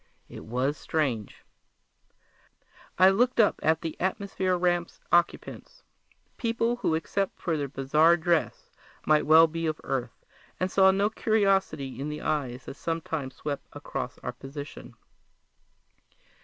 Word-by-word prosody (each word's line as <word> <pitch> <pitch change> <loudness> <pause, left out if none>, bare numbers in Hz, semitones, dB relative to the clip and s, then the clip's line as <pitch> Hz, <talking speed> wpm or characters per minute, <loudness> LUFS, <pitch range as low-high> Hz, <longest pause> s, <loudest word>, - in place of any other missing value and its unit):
It - - -10
was 130 +6 -1
strange. 130 -10 -2 1.5
I 185 +2 +7
looked 245 +5 +1
up 215 - +4
at 160 0 +2
the 165 - -4
observation 190 -1 -1
ramp's 175 -1 0
occupants 175 - 0 0.5
people 230 +1 0
who 190 -9 0
except 195 +4 -2
for 165 - -1
their 145 -2 -2
bizarre 150 +5 +3
dress 170 -1 -1 0.3
might 150 -1 +3
well 160 +1 +8
be 165 0 -3
of 155 0 -2
Earth 125 -3 -4 0.3
and 185 0 -1
saw 190 -1 +6
no 200 +2 +2
curiosity 195 - +1
in 145 +2 -3
the 150 0 -5
eyes 130 -5 -2
that 135 - -8
sometimes 160 -5 -4
swept 145 -2 -5
across 145 -3 -5
our 125 - -4
position. 140 +4 -9
160 Hz, 130 wpm, -27 LUFS, 140-190 Hz, 1.5 s, well